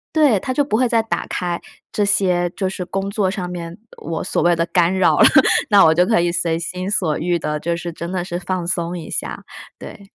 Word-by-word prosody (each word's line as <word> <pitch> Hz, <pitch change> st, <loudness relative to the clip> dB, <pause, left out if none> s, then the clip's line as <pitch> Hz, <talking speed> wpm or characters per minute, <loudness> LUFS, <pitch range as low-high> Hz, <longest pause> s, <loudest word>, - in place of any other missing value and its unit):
对， 280 Hz, -10 st, +4 dB
它 255 Hz, -, -3 dB
就 290 Hz, -, +2 dB
不 275 Hz, -, -2 dB
会 255 Hz, 0 st, +2 dB
再 230 Hz, -1 st, +3 dB
打 225 Hz, -, -3 dB
开 175 Hz, -1 st, -3 dB, 0.3 s
这 210 Hz, -, 0 dB
些 180 Hz, -3 st, +1 dB
就 190 Hz, 0 st, -3 dB
是 185 Hz, -1 st, -5 dB
工 195 Hz, +2 st, -3 dB
作 200 Hz, -2 st, 0 dB
上 180 Hz, -3 st, -4 dB
面 170 Hz, 0 st, -7 dB, 0.2 s
我 160 Hz, +1 st, -5 dB
所 -, -, -1 dB
谓 175 Hz, 0 st, +4 dB
的 170 Hz, 0 st, 0 dB
干 175 Hz, +1 st, +2 dB
扰 185 Hz, -, +3 dB
了。 -, -, +7 dB, 0.4 s
那 205 Hz, -2 st, +6 dB
我 160 Hz, -, +5 dB
就 180 Hz, +2 st, +3 dB
可 220 Hz, 0 st, +2 dB
以 170 Hz, 0 st, +1 dB
随 165 Hz, -1 st, -1 dB
心 185 Hz, +3 st, -4 dB
所 165 Hz, -7 st, 0 dB
欲 175 Hz, -1 st, -1 dB
地 150 Hz, 0 st, -2 dB
就 170 Hz, +2 st, -2 dB
是 170 Hz, -1 st, -6 dB
真 170 Hz, +2 st, -6 dB
的 180 Hz, -2 st, -2 dB
是 175 Hz, -1 st, -4 dB
放 180 Hz, -2 st, -3 dB
松 175 Hz, -1 st, -2 dB
一 160 Hz, -2 st, -8 dB
下， -, -, -5 dB, 0.4 s
对。 200 Hz, -, -10 dB
180 Hz, 255 characters per minute, -19 LUFS, 170-195 Hz, 0.4 s, 了